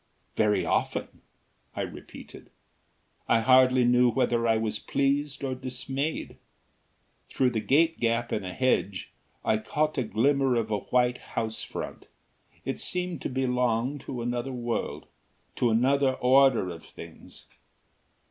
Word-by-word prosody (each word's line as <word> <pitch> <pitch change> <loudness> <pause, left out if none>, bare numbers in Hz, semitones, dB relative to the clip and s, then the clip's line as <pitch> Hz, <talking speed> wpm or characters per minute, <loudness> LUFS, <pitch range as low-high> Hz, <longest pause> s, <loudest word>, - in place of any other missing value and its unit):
"Very 105 -4 +2
often?" - - -2 0.5
I - - -2
repeated. - - -9 0.8
I 115 - +3
hardly 130 +1 +5
knew 125 0 +4
whether 115 0 +1
I 115 -1 +3
was 110 -1 -2
pleased 140 +1 -1
or 135 -1 -1
dismayed. 130 +3 -4 0.9
Through 130 -2 +1
the 115 - -1
gate 160 +8 +2
gap 115 0 0
in 105 - -1
a 90 - -5
hedge, 100 -4 0 0.3
I 110 - +2
caught 150 +5 -1
a - - +1
glimmer 130 +4 +2
of 110 -2 -1
a 105 - +1
white 125 +2 +1
house 110 -1 -4
front. - - -7 0.6
It - - -3
seemed 180 -5 -1
to - - -3
belong 125 0 0
to 125 -2 -6
another 120 +2 -2
world; 120 -2 -3 0.5
to 120 - +2
another 130 +4 +3
order 130 -6 +4
of 80 -1 -10
things. - - -13
125 Hz, 135 wpm, -27 LUFS, 115-135 Hz, 0.9 s, hardly